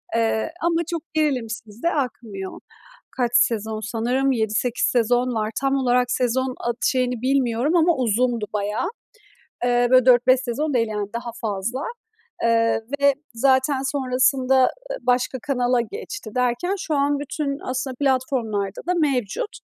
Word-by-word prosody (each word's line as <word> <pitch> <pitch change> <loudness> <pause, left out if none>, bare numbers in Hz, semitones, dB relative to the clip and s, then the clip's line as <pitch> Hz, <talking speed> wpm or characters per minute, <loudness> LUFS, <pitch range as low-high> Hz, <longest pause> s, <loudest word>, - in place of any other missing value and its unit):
Eee, 225 +4 +1
ama 335 0 +1
çok 335 - -2
gerilimsiz 230 -8 -2
de 340 - +3
akmıyor. 225 -9 -4 0.6
Kaç 240 -2 +1
sezon, 220 -1 +2
sanırım 250 +4 +1
7-8 225 +1 0
sezon 245 +1 +2
var. 215 0 0
Tam 275 0 +1
olarak 250 -2 +2
sezon 255 +1 0
at 240 0 -2
şeyini 250 -3 +1
bilmiyorum 260 +2 +1
ama 340 0 +4
uzundu 240 -2 +1
bayağı. 210 - -1 0.8
Eee, 245 0 +3
böyle, 255 -1 +6
4-5 255 +1 +5
sezon 275 +4 -2
değil, 230 -2 +2
yani, 210 -1 -3
daha 235 0 -4
fazla. 225 +5 -2 0.6
Eee, 230 -1 +3 0.2
ve 280 0 +5 0.2
zaten 265 +2 +2
sonrasında, 260 -1 +2
ııı, 255 - +5 0.3
başka 250 +1 +1
kanala 250 -2 +2
geçti 410 - -7
derken 250 +10 0
şu 315 -5 -2
an 285 0 +1
bütün 285 0 -3
aslında 260 0 -3
platformlarda 245 -7 0
da 360 - +3
mevcut. 295 - 0
250 Hz, 140 wpm, -23 LUFS, 230-275 Hz, 0.8 s, böyle